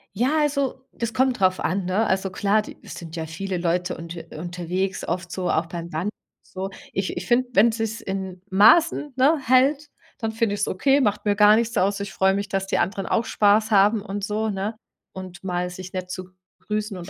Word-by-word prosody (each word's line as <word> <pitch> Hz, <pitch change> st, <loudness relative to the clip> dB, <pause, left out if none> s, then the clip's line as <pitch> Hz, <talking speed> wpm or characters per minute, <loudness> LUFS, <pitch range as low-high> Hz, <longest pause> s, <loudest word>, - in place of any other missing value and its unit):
Ja 265 Hz, +7 st, +2 dB
also, 280 Hz, -3 st, 0 dB
das 230 Hz, -1 st, -3 dB
kommt 260 Hz, -3 st, +2 dB
drauf 185 Hz, -1 st, +3 dB
an, 185 Hz, +1 st, -1 dB
ne? 200 Hz, +5 st, +1 dB
Also 195 Hz, -1 st, 0 dB
klar, 205 Hz, +3 st, +1 dB
die -, -, -11 dB
es -, -, -9 dB
sind 165 Hz, -1 st, -9 dB
ja 160 Hz, -1 st, -3 dB
viele 185 Hz, +4 st, -4 dB
Leute 175 Hz, +1 st, -1 dB
unter 170 Hz, 0 st, -7 dB, 0.2 s
unterwegs, 180 Hz, +3 st, -3 dB
oft 175 Hz, 0 st, -3 dB
so 185 Hz, -2 st, -2 dB
auch 160 Hz, -, +1 dB
beim 170 Hz, 0 st, -7 dB
Wandern 170 Hz, +6 st, -2 dB
und -, -, -49 dB
so. 190 Hz, +1 st, -5 dB, 0.2 s
Ich 195 Hz, 0 st, -2 dB
ich -, -, -4 dB
finde, 245 Hz, +1 st, +2 dB
wenn 220 Hz, +4 st, +5 dB
sich's 225 Hz, 0 st, -3 dB
in 190 Hz, -1 st, -5 dB
Maßen, 290 Hz, -, +5 dB
ne, 285 Hz, +5 st, +4 dB
hält, 275 Hz, +4 st, +3 dB, 0.3 s
dann 225 Hz, -2 st, -2 dB
finde 225 Hz, -2 st, 0 dB
ich's 205 Hz, -, -1 dB
okay, 275 Hz, +9 st, +2 dB
macht 210 Hz, -2 st, 0 dB
mir 205 Hz, -1 st, +2 dB
gar 210 Hz, +1 st, +7 dB
nichts 235 Hz, +1 st, 0 dB
aus. 200 Hz, +2 st, +2 dB
Ich 200 Hz, -1 st, -5 dB
freue 190 Hz, 0 st, +3 dB
mich, 200 Hz, 0 st, -2 dB
dass 195 Hz, -1 st, -2 dB
die -, -, 0 dB
anderen 195 Hz, +1 st, -1 dB
auch 230 Hz, -, +1 dB
Spaß 215 Hz, +1 st, +3 dB
haben 205 Hz, +1 st, +4 dB
und 205 Hz, -1 st, -5 dB
so, 215 Hz, +1 st, -1 dB
ne? 200 Hz, +3 st, -3 dB, 0.4 s
Und 185 Hz, -1 st, -9 dB
mal 180 Hz, -1 st, -2 dB
sich 185 Hz, +1 st, -9 dB
nett 185 Hz, -1 st, -4 dB
zu 185 Hz, 0 st, -5 dB, 0.3 s
grüßen 210 Hz, -1 st, -3 dB
und 180 Hz, +1 st, -8 dB
195 Hz, 215 wpm, -23 LUFS, 185-225 Hz, 0.4 s, gar